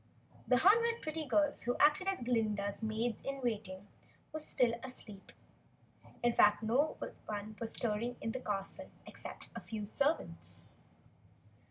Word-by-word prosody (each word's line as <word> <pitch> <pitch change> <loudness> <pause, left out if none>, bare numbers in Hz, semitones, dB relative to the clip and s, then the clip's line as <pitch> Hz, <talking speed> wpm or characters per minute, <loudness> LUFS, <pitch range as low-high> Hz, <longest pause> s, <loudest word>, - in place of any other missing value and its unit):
The 250 - +5
hundred 460 - +5
pretty 310 -1 -3
girls 295 +2 +2
who 245 - 0
acted 300 +6 +5
as 390 -6 0
Glinda's 215 -4 0
Maids 220 +1 -1
in 275 0 -3
Waiting 205 -5 -2 0.5
were 310 - -2
still 250 -5 +2
asleep. 215 -6 -8 0.9
In 240 0 +4
fact 210 0 +5
no 255 +8 +2 0.3
one 210 +1 -4
was 230 -1 -2
stirring 235 +2 -1
in 225 - -2
the 260 - -3
castle 200 -5 -3 0.2
except - - -8
a - - -3
few 215 -2 -4
servants. 280 +9 -1
240 Hz, 140 wpm, -35 LUFS, 215-295 Hz, 0.9 s, The